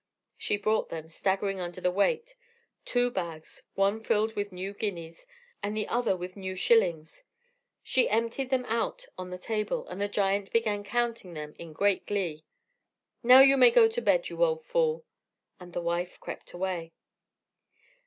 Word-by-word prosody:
She 205 - -1
brought 215 +2 0
them, 160 -1 -6
staggering 195 +3 -1
under 175 0 -5
the 180 0 +1
weight: 470 - 0 0.5
two 245 0 +1
bags 165 -6 -6
one 200 +3 +1
filled 220 +1 +1
with 205 -1 -3
new 185 +2 -5
guineas, 180 - -5 0.3
and 210 +1 -3
the 215 - -1
other 235 -5 +1
with 180 +1 -7
new 190 -2 -5
shillings; 180 - +2 0.6
she 260 - +3
emptied 230 +4 -1
them 255 -1 0
out 245 - -2
on 185 0 -7
the 180 - -6
table, 210 +2 -2
and 180 +2 -6
the 205 - +1
giant 200 -1 0
began 215 -3 +1
counting 230 -4 -2
them 150 -1 -7
in 165 -1 -9
great 200 +5 +1
glee. 175 -7 -2 0.8
"Now 255 +2 +9
you 270 0 +7
may 475 - +8
go 475 -1 +6
to 470 +2 -3
bed, - - +2
you - - -1
old 480 -1 0
fool." 485 -1 0 0.5
So 180 - -11
the 175 0 -4
wife 170 +1 -2
crept - - -8
away. 175 -2 -4
205 Hz, 165 wpm, -28 LUFS, 180-240 Hz, 0.8 s, Now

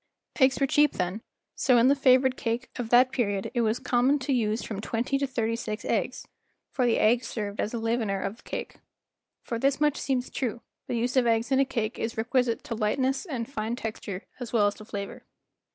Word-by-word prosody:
Eggs 260 -1 +5
w - - -7
7 - - +4
ere - - +3
cheap 295 +2 +4
then, 185 +4 -2 0.3
so 255 -3 +3
in 235 +2 +5
the 275 - +6
favored 260 -1 +4
cake 235 +2 -3
of 240 -3 -4
that 250 +2 +6
period 205 -7 -1
it 240 - +1
was 220 0 +1
common 255 +2 +2
to 275 0 -1
use 220 -2 0
from 205 -3 -5
twenty 240 +5 -1
to 280 - 0
thirty 230 -3 -1
six 215 -2 -5
eggs; - - -1 0.4
for 250 -2 +1
the 230 - +3
egg 235 +3 +3
served 210 -3 -5
as 210 - -1
a 235 - -3
leavener 225 -3 0
of 195 +3 -4
the - - -19
cake. - - -6 0.7
For 230 - -3
this 275 +3 +2
much 300 -1 +2
seems 260 -2 -1
true, 235 -3 -3 0.2
the 240 - -1
use 245 +3 -1
of 255 -2 +4
eggs 230 +2 +1
in 265 - +4
a 275 - +4
cake 225 -4 -3
is 225 0 -3
requisite 235 +1 +1
to - - -5
lightness 260 - 0
and 240 -7 -3
fine 225 -3 -3
texture 215 -4 -6
as 245 -3 -6
well 220 -4 +3
as 205 - +2
to 215 - -12
flavor. 200 -2 -6
235 Hz, 225 wpm, -27 LUFS, 220-260 Hz, 0.7 s, the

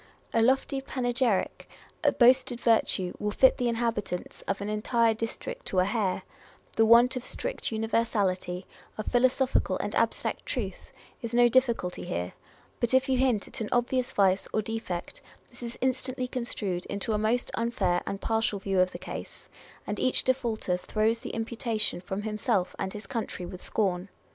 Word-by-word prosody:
A 230 - +3
lofty 270 +3 +2
panegyric, 245 -5 0 0.3
a - - +5
boasted 255 0 +4
virtue 220 -6 +2
will 210 - -1
fit 260 +5 +4
the 245 - +1
inhabitants 230 -6 -2
of 195 - -1
an 200 - -4
entire 225 +2 +2
district 360 - -5
to 190 - -2
a 185 - +5
hair; 200 -3 0 0.5
the 225 0 +4
want 235 +3 +7
of 250 - -3
strict - - -3
univer 225 +1 +1
sality, 185 -4 -1 0.3
of 215 - -4
philosophical 255 +1 +2
and - - -3
abstract - - 0
truth, - - -4 0.3
is 235 0 -3
no 240 0 +7
difficulty 235 -7 +1
here; 90 +1 -3 0.5
but 240 +2 +2
if 260 +1 +4
you 260 -1 +2
hint 250 -6 +2
at - - -8
an 215 - -2
obvious 245 +1 +1
vice 190 -1 +2
or 215 - 0
defect, 225 - -5 0.3
this - - -15
is 235 0 -6
instantly 255 0 -1
construed 210 -8 -3
into 200 +3 -2
a 210 - +1
most 225 +3 +1
unfair 200 -7 +1
and 195 - -3
partial 225 -2 0
view 195 -1 0
of 185 0 +3
the - - -4
case, - - -8 0.4
and 210 - -3
each 255 - +3
defaulter 230 -8 0
throws 215 +5 0
the - - -7
imputation 225 -3 -1
from 190 +3 -4
himself 210 -3 0
and 190 - -2
his 210 - -7
country 225 -7 -4
with 180 +1 -8
scorn. 190 -3 -1
225 Hz, 170 wpm, -28 LUFS, 200-245 Hz, 0.5 s, want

